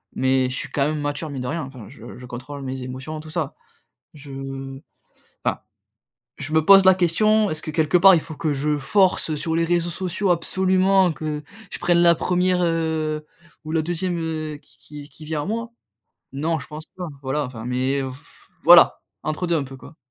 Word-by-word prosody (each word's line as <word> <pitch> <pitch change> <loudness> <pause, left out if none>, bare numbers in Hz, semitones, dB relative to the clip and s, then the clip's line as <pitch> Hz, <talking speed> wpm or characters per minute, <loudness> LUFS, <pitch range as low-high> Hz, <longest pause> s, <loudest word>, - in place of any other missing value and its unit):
mais 130 -1 +2
je 125 - -4
suis 130 - -4
quand 140 +1 0
même 155 -1 -2
mature, 145 +2 -3
mine 135 -3 -5
de 125 - -4
rien, 160 +4 -2
enfin 130 -6 -11
je 120 -2 -11
je 125 - -10
contrôle 130 +4 -8
mes 130 0 -5
émotions 130 +5 -6
tout 155 +1 -11
ça. 165 0 -2 0.6
Je 140 -2 -11 1.1
enfin, - - 0 0.8
je 155 - -6
me 160 0 +4
pose 195 +3 +7
la 190 0 +7
question, 210 +5 +2
est-ce 155 - -5
que, - - -5
quelque 160 +2 +2
part, 190 +2 +8
il 165 - +3
faut 160 - -9
que 155 -1 -1
je 150 +2 0
force, 180 +5 +2
heu, 155 - -1
sur 160 +2 -2
les 165 - +2
réseaux 170 0 +1
sociaux 185 +2 -2
absolument 185 +1 +3
que 150 -1 -4 0.3
je - - -4
prenne 175 -1 +2
la 170 0 +6
première, 180 +2 +1
heu, 160 -2 -1 0.4
ou 155 - -6
la 165 - +2
deuxième, 175 +2 -2
heu, 155 -2 -4
qui - - -24
qui 150 0 -11
v - - -16
qui 155 - -14
vient 150 -1 -3
à - - -4
moi? 230 +3 -3 0.6
Non, 155 +3 -1
je 130 - -11
pense 155 +1 -8
pas 180 -2 -5
voilà, 135 +3 -1
enfin, 115 -3 -9
mais, 130 +3 0
heu, 130 -1 -5
f 130 - -16
voilà, - - +7 0.2
entre 155 +3 -2
deux 170 - +2
un 145 - -1
peu, 135 0 -10
quoi. 130 +5 -14
155 Hz, 210 wpm, -22 LUFS, 140-175 Hz, 1.1 s, part